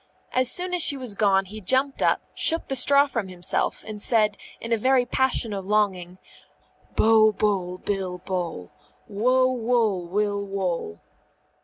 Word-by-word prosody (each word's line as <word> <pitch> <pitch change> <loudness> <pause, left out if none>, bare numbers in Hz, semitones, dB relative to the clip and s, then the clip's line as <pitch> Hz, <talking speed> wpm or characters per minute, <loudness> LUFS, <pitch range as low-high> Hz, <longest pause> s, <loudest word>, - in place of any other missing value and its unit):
As 255 -1 +2
soon 360 +4 0
as 355 - +2
she 285 - +5
was 250 -5 -4
gone 195 -2 +2
he 215 +3 -9
jumped 260 +7 0
up, - - +2
shook 330 0 +2
the 270 - -1
straw 280 +2 +5
from 230 -8 -4
himself, 180 -1 -2
and 210 -1 -8
said 215 -2 +2 0.2
in 230 - -7
a - - +4
very 255 +3 +2
passion 250 -3 0
of 195 -1 -6
longing, 190 -4 -1 0.8
Bo, 220 -1 +4
boll, 190 -4 -2
bill, 190 -2 -4
bole. 175 - -5 0.4
_Wo, 255 +5 +1
woll, 225 -7 0
will, 205 +2 -1
wole. 180 - -4
210 Hz, 155 wpm, -24 LUFS, 190-255 Hz, 0.8 s, she